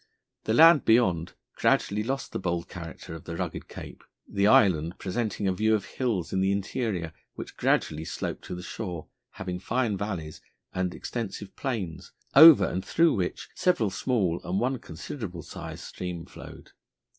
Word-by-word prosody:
The 110 - +1
land 165 -1 +8
beyond 95 -8 +3 0.2
gradually 105 +1 +2
lost 135 +5 -3
the - - -3
bold 85 -2 -2
character 85 -2 -8
of 80 - -9
the 85 - -5
rugged - - -4
cape, - - -10 0.2
the 100 0 +1
island 85 -6 +4
presenting 100 +1 -2
a 95 - +2
view 110 +4 +2
of 105 - -2
hills 110 -10 -2
in 95 - +1
the 95 +1 +2
interior 100 -4 -2 0.2
which - - -8
gradually 75 +1 +1
sloped - - -5
to - - -5
the 90 - -7
shore, 90 -7 -6 0.2
having 90 -1 -5
fine 115 0 0
valleys 90 -7 -5 0.3
and 90 -1 -1
extensive 105 -4 -5
plains, 95 - -4 0.2
over 150 - +10
and 90 +2 -2
through 165 +8 +3
which 90 -4 -3
several 120 - +1
small 95 -10 0
and 95 +2 -1
one 130 +1 0
considerable 90 - -7
sized 80 0 -8
stream 90 -2 -6
flowed. - - -12
95 Hz, 160 wpm, -27 LUFS, 85-115 Hz, 0.3 s, over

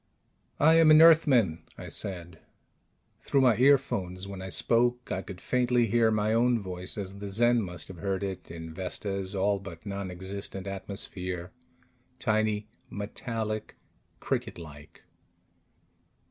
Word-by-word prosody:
"I 160 +3 +6
am 160 -1 +6
an 155 0 +8
Earthman," 135 - +5 0.2
I - - -8
said. 85 -3 -3 0.8
Through 140 - +1
my 125 -4 +5
earphones, 105 -9 +2
when 100 -1 -7
I 95 - -6
spoke, 120 +4 +1
I 95 - -1
could 95 -2 -9
faintly 125 +1 +2
hear 115 +1 +3
my 110 0 +1
own 120 +1 +3
voice 90 0 -5
as 100 -1 -5
the 100 0 -6
Zen 120 +4 +3
must 90 -4 -6
have 95 - -10
heard 100 +1 -2
it 95 -2 -5
in 80 -1 -8
Vesta's 95 +2 -4
all 100 +1 +1
but 85 -3 -10
nonexistent 95 0 -5
atmosphere: 95 -2 -4 0.7
tiny, 110 -3 0 0.2
metallic, 110 +1 -4 0.4
cricket - - -3
like. 75 -2 -12
100 Hz, 130 wpm, -28 LUFS, 95-115 Hz, 0.8 s, an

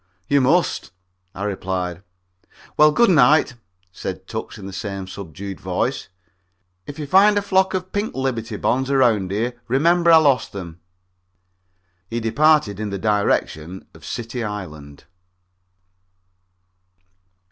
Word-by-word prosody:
"You 140 -1 +3
must," 165 +7 +1 0.5
I 100 - -5
replied. 95 -3 -3 0.7
"Well, 150 0 +6
good 235 +5 +4
night," 150 -3 +4 0.4
said 95 +1 -6
Tucks 110 0 -6
in 100 - -10
the 95 - -8
same 100 -1 -5
subdued 95 +1 -8
voice. 95 +8 -2 0.8
"If 145 - -8
you 150 - -4
find 200 +7 +5
a - - +2
flock 190 -1 +2
of 185 0 -4
pink 205 +2 -2
Liberty 130 -4 -3
Bonds 130 +1 0
around 120 -9 +2
here, 120 +5 -3
remember 170 +7 +3
I 165 - +9
lost 145 -5 +2
them." 85 -4 -8 1.3
He 115 - -2
departed 115 -2 +2
in 105 -1 -3
the 100 - -3
direction 95 -4 -1
of - - -17
City 120 +1 -5
Island. 80 -9 -7
115 Hz, 125 wpm, -21 LUFS, 95-150 Hz, 1.3 s, I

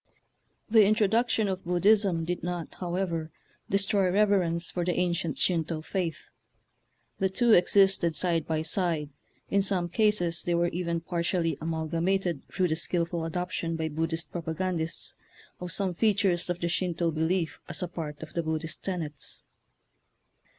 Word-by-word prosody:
The 220 -1 +6
introduction 220 +1 +2
of 190 -1 -3
Buddhism 180 -1 +3
did 175 +1 -2
not, 175 -1 -3
however, 175 -3 -2 0.4
destroy 195 -1 +2
rev 210 +2 +4
erence 170 -4 +1
for 175 - -1
the 175 0 0
ancient 175 -3 0
Shinto 165 -3 0
faith. 170 -3 -2 1.0
The 190 - +2
two 235 +5 +2
existed 190 -3 +4
side 170 -3 +1
by 160 -1 0
side; 160 -3 -1 0.4
in 200 - +4
some 190 -3 0
cases 195 -5 +1
they 175 - 0
were 170 0 +2
even 170 -1 -2
partially 170 -1 0
amalgamated 165 +1 -1
through 185 -2 +1
the 160 - +1
skilful 170 0 -1
adoption 170 0 -2
by 160 -1 -2
Buddhist 165 +2 -2
propagandists 170 0 -2 0.4
of 180 -1 -5
some 190 0 -1
features 195 -3 +2
of 175 0 -1
the 170 - +1
Shinto 170 -1 0
belief 160 +2 0 0.3
part 150 -2 -5
of 155 - -10
the 170 - 0
Buddhist 160 0 -3
tenets. 160 -6 -3
175 Hz, 140 wpm, -28 LUFS, 165-190 Hz, 1.0 s, The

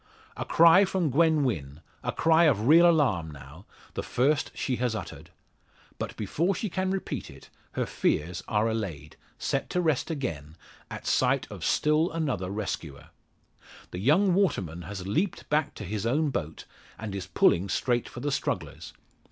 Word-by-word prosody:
A - - -4
cry 170 +4 +6
from 185 -6 0
Gwen 160 +1 +3
Wynn 75 - -3 0.2
a - - -1
cry 165 +1 +4
of 115 -7 +2
real 170 +4 +7
alarm, 125 - +2
now 75 +5 -12 0.3
the - - -3
first 145 +4 +1
she 130 -3 -2
has 120 -2 -1
uttered! - - -8 0.7
But - - -5
before 165 - 0
she 205 +2 -3
can 185 +1 -1
repeat 190 0 -3
it, - - -15 0.2
her - - -1
fears 85 +4 -1
are 105 +1 +1
allayed 90 -10 -4 0.2
set 135 - -2
to 180 - 0
rest 160 -5 +1
again 80 - -4 0.3
at - - -8
sight - - +2
of - - -8
still 155 +3 +2
another 130 - -2
rescuer. 95 -8 -5 0.8
The 90 - -5
young 170 - +3
waterman 95 - 0
has 95 +2 -7
leaped 165 - -1
back 150 0 +1
to - - -7
his 105 +3 -3
own 145 +4 +1
boat, 80 - -4 0.3
and 110 -2 -6
is 95 -2 -5
pulling 90 +1 +3
straight 120 +3 0
for 120 - -9
the 145 - -1
strugglers. - - -3
125 Hz, 165 wpm, -27 LUFS, -, 0.8 s, real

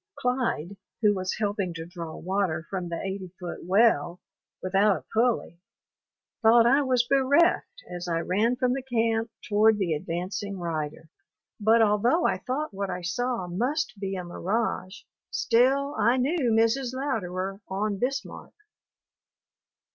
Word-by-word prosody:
Clyde, 245 - -1 0.3
who 210 -1 +5
was 185 -1 -3
helping 200 -5 -2
to 165 0 -6
draw 170 -2 -7
water 180 -3 -1
from 180 -3 -3
the 170 - -3
eighty 190 -1 -4
foot 175 -2 -6
well 180 -3 +3 0.4
without 195 +2 +2
a - - -13
pulley, 225 -7 0 0.8
thought 230 0 +6
I 270 +5 +5
was 255 -3 +2
bereft 285 - +2
as 175 0 -6
I 165 -1 0
ran 215 +8 +1
from 250 0 +1
the 270 - -2
camp 230 -3 0 0.2
toward 215 +1 +4
the 185 -5 0
advancing 180 +6 -4
rider. 160 -2 -4 0.5
But 225 +2 +5
although 225 - +2
I - - +1
thought 280 +1 -3
what 195 0 -3
I 180 -1 -4
saw 235 +3 -1
must 240 - -1
be 195 -1 -3
a 180 - -4
mirage, 185 +2 -2 0.3
still 270 +4 +2
I 235 +1 +2
knew 270 0 +1
Mrs. 230 +3 +2
Louderer 195 -7 -3
on 200 +1 -2
Bismarck. 270 +4 -4
210 Hz, 140 wpm, -26 LUFS, 180-245 Hz, 0.8 s, thought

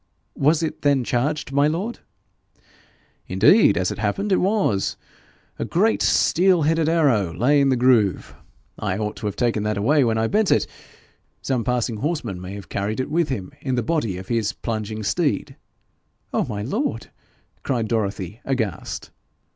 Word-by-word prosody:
'Was 155 +4 +2
it 160 - -3
then 140 -3 +2
charged, 140 +5 -1
my 140 +1 +3
lord?' 185 +10 -3 1.3
'Indeed, 105 - +5
as 90 0 0
it - - -6
happened, 110 - -1
it 190 - +4
was. 190 - +1 0.6
A - - -1
great 215 +6 +1
steel 180 -1 +3
headed 160 +1 +2
arrow 135 - +2
lay 140 +4 +3
in 140 - +3
the 130 - +3
groove. 120 -6 +2 0.5
I 95 - -2
ought 105 0 -3
to 105 - -4
have 100 - -3
taken 115 -3 0
that 105 -1 -1
away 140 +8 +3
when 115 -2 +1
I 110 - +1
bent 210 - +1
it. - - +3 0.8
Some 130 -4 0
passing 120 -2 -1
horseman 125 - -3
may 95 +2 -7
have 100 - -9
carried 105 +3 -3
it 130 - -3
with 165 -1 +1
him 100 -9 -4
in 130 -2 -1
the 120 - 0
body 115 - -1
of 95 +1 -9
his 110 -3 0
plunging 110 -1 -4
steed.' 100 -1 -1 0.8
'Oh, - - +1
my 105 -1 -4
lord!' 225 - -3 0.5
cried 120 -5 -1
Dorothy, 105 -2 -3
aghast. 120 -8 -3
120 Hz, 165 wpm, -22 LUFS, 105-150 Hz, 1.3 s, Indeed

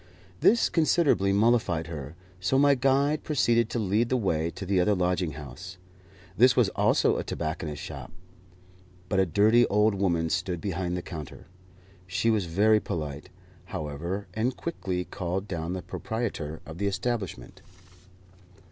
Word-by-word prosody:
This 235 - +4
considerably 155 - +2
mollified 100 -6 +2
her, 75 -2 -7 0.2
so 115 +8 +1
my 140 +1 +5
guide 140 +3 +2
proceeded 120 -6 +2
to - - -3
lead 110 +2 +1
the 130 - +2
way 85 -7 0
to 95 - -7
the 95 0 +2
other 105 +3 +3
lodging 90 -3 0
house. 80 +6 -9 0.6
This 125 +4 +5
was 120 -6 +4
also - - +2
a - - -2
tobacconist's 80 -2 -4
shop, - - -8 1.0
but 95 - +1
a 95 - +3
dirty 110 +7 +4
old 105 +1 +3
woman 85 -4 0
stood 90 -1 -1
behind 90 -1 -2
the 90 - -5
counter. 75 -5 -8 0.6
She 95 +6 +1
was 105 -4 +1
very 105 +6 +3
polite, 75 -6 -5 0.4
however, 85 +7 -4
and 120 +4 -1
quickly 95 - -3
called 95 +2 -4
down 85 -2 -3
the 95 - -5
proprietor 100 -9 -4
of 80 +1 -9
the 100 - 0
establishment. 100 - -3
95 Hz, 145 wpm, -27 LUFS, 85-115 Hz, 1.0 s, my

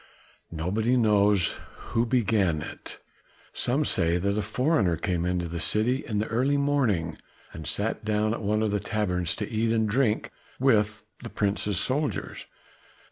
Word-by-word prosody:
Nobody 105 +10 0
knows 105 -4 +3 0.3
who 115 +1 +1
began 100 - +1
it. - - -9 0.5
Some - - 0
say 85 +1 +2
that 100 +3 0
a 105 - 0
foreigner 110 - +1
came 85 0 -1
into 90 -1 -1
the 85 +1 -5
city 120 - 0
in 105 - -3
the 105 - +1
early 130 +6 +1
morning 125 - 0 0.3
and 80 - -8
sat 110 +3 -1
down 105 0 +1
at - - -4
one 105 +1 +1
of 110 - 0
the 105 - 0
taverns 95 -5 -1
to 105 - -4
eat 110 0 0
and 110 -1 +2
drink 110 -1 +1 0.3
with 110 -5 +2 0.2
the - - -7
Prince's 100 -2 0
soldiers." 145 +3 -2
105 Hz, 155 wpm, -27 LUFS, 95-115 Hz, 0.5 s, knows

